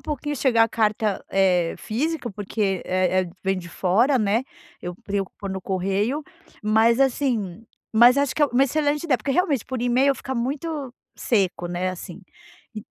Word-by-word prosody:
pouquinho 295 0 -4
chegar 235 -4 +4
a - - -3
carta, 215 -2 0
eh, 180 -3 +2
física, 265 +3 -2
porque 200 -1 -2
é 185 0 +1
é 180 - -7
vem 190 0 0
de 170 -2 -9
fora, 220 - +2
né, 215 +2 +1 0.4
eu 175 0 -5
preocupo 200 0 -4
no 190 0 -4
correio, 195 +10 -1 0.4
mas 220 +3 +3
assim 235 -7 0 0.3
Mas 240 +4 +7
acho 280 -1 +1
que 305 - +1
é - - +6
uma 265 0 +3
excelente 295 +2 0
ideia, 290 -6 +2
porque 235 +4 -4
realmente 290 - +1
por 260 -2 -4
e-mail, 255 +3 +3
fica 265 0 -6
muito 275 +2 -3 0.2
seco, 190 -6 0
né, 175 +1 -2
assim. 185 - -9 0.6
E 215 - -6
225 Hz, 165 wpm, -23 LUFS, 195-270 Hz, 0.6 s, Mas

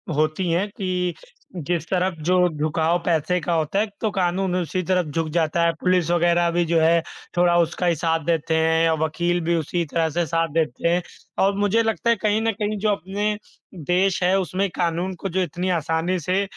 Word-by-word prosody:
होती 155 +4 0
हैं 180 +5 +1
कि 180 -2 -1 0.4
जिस 170 -1 -2
तरफ 185 -1 0
जो 185 - +4
झुकाव 160 +2 0
पैसे 170 +1 +1
का 170 +2 -1
होता 160 +4 0
है, 215 - +2 0.2
तो 220 - +1
कानून 185 0 0
उसी 185 +1 -1
तरफ 180 0 +1
झुक 165 +1 -1
जाता 170 +1 +1
है, 170 - +2
पुलिस 180 -2 +2
वगैरह 175 0 +3
भी 175 +1 +1
जो 165 0 +2
है 165 +1 +4 0.4
थोड़ा 175 0 +4
उसका 170 +2 0
ही 170 -2 +3
साथ 165 0 0
देते 165 -1 0
हैं, 160 +1 +3
वकील 175 +3 0
भी 170 +1 +2
उसी 170 +2 -1
तरह 165 -1 +1
से 170 +2 -1
साथ 165 +1 0
देते 160 -2 0
हैं। 175 +1 +2 0.4
और 195 +1 +2
मुझे 205 +3 +2
लगता 225 0 -1
है 235 - +5
कहीं 215 0 +1
न 225 0 +1
कहीं 210 0 -1
जो 215 +2 +1
अपने 205 +3 -1 0.5
देश 185 +2 +2
है 185 +2 +3
उसमें 190 +2 -1
कानून 175 +2 -1
को 195 +3 -5
जो 185 +2 0
इतनी 180 +3 -3
आसानी 165 +4 -1
से 185 +5 0
175 Hz, 200 wpm, -22 LUFS, 165-185 Hz, 0.5 s, है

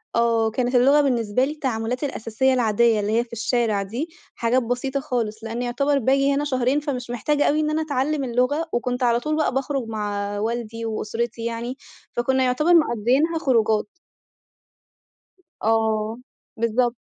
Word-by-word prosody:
آه، 230 -1 +2
كانت 250 +2 -1
اللغة 275 +4 +5
بالنسبة 245 -2 +1
لي 295 - -3
التعاملات 250 -3 -3
الأساسية 265 0 0
العادية، 230 -2 +3
اللي 205 +1 -1
هي 235 - +1
في 235 - -17
الشارع 225 -2 0
دي، 240 - -4 0.3
حاجات 245 +2 +1
بسيطة 245 +4 -2
خالص، 230 -4 -3
لإن 230 +2 -4
يُعتبر 275 +4 +1
باجي 275 +3 +2
هنا 285 +1 0
شهرين 260 +1 +1
فمش 255 -5 -4
محتاجة 290 +5 +1
أوي 300 +1 +2
إن 305 - +1
أنا 310 +1 0
أتعلم 290 -1 -1
اللغة، 255 +6 0
وكنت 245 +1 -1
على 235 -1 +3
طول 305 +4 -2
بقى 310 -4 +1
باخرج 270 -2 -2
مع 205 -2 -3
والدي 230 +1 -3
وأسرتي 230 +1 -3
يعني، 235 +2 -4 0.3
فكنا 260 +2 +1
يُعتبر 300 +8 +2
مقضّيينها 290 +3 +3
خروجات. 220 -7 +2 1.7
آه، 220 0 +1 0.4
بالضبط. 235 +2 +1
245 Hz, 150 wpm, -23 LUFS, 225-275 Hz, 1.7 s, اللغة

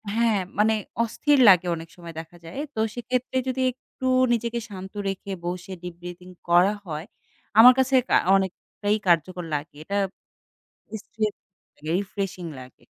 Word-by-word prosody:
হ্যাঁ, 230 -3 +3 0.2
মানে 215 +1 +4 0.3
অস্থির 280 +6 +2
লাগে 180 -2 +6
অনেক 165 0 -9
সময় 170 -2 -10
দেখা 165 +2 -10
যায়। 175 +12 -7 0.2
তো 220 - -3 0.2
সেক্ষেত্রে 250 +1 -2
যদি 260 0 -1
একটু 255 +1 -11 0.3
নিজেকে 235 0 -1
শান্ত 190 0 -8
রেখে, 195 0 -4
বসে 180 +2 -4
ডীপ 175 -1 -7
ব্রিথিং 175 +1 -9 0.2
করা 180 +4 +5
হয়, 155 -1 -5 0.5
আমার 250 +2 +11
কাছে 265 +1 +2 0.2
আ - - +8 0.2
অনেকটাই 195 +2 -1
কার্যকর 175 +1 +2
লাগে। 145 0 -5
এটা 200 +5 -2 1.1
স্ট্রেস 215 -2 -2 0.6
রিফ্রেশিং 190 0 -2
লাগে। 130 0 -15
195 Hz, 140 wpm, -25 LUFS, 175-225 Hz, 1.1 s, আমার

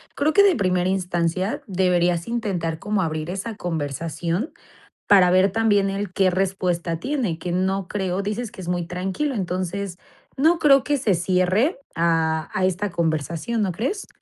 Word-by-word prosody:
creo 300 +2 +1
que, 405 - +6
de 390 -4 +5
primera 185 -4 +1
instancia, 185 0 -1
deberías 180 -3 +1
intentar 195 -9 -2
como 210 +1 -1
abrir 160 -3 -1
esa 195 +5 -4
conversación 165 - -3 0.6
para 190 -3 +6
ver 185 +2 +4
también, 205 -2 +2
él 195 -1 -4
qué 190 -1 +3
respuesta 180 -3 -1
tiene, 245 - -1
que 175 - -5
no 190 +1 0
creo, 190 -2 -2
dices 215 +3 -3
que - - -10
es 175 - -7
muy 175 -1 -1
tranquilo, 190 - -2
entonces, 185 -1 -3 0.4
no 320 +5 +4
creo 275 -4 +5
que 290 - +1
se 225 -7 +2
cierre 185 - +1 0.2
a 160 -1 +1
a 185 - +1
esta 190 +2 -1
conversación, 170 +7 -1
¿no 190 - 0
crees? 265 - -3
185 Hz, 160 wpm, -23 LUFS, 175-210 Hz, 0.6 s, que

